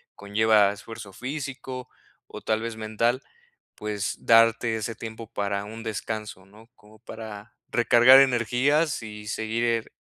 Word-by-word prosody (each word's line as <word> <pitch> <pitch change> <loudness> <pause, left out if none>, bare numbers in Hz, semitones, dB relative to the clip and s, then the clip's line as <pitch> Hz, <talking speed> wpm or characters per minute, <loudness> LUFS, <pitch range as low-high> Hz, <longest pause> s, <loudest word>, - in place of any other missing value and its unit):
conlleva 105 0 +3
esfuerzo 105 -1 -10
físico, 130 -1 -6 0.4
o - - -9
tal 110 0 0
vez 115 -1 -4
mental, 110 +4 0 0.5
pues 105 0 -4
darte 115 0 +4
ese 115 +1 -4
tiempo 110 0 -8
para 100 0 -2
un 110 +2 -9
descanso, 110 -2 -5
¿no? 110 +3 -18
Como 105 0 -20
para 110 -1 -10
recargar 120 +2 +7
energías 135 +4 +2
y 105 -1 -9
seguir 115 +1 -1
110 Hz, 125 wpm, -25 LUFS, 105-120 Hz, 0.5 s, recargar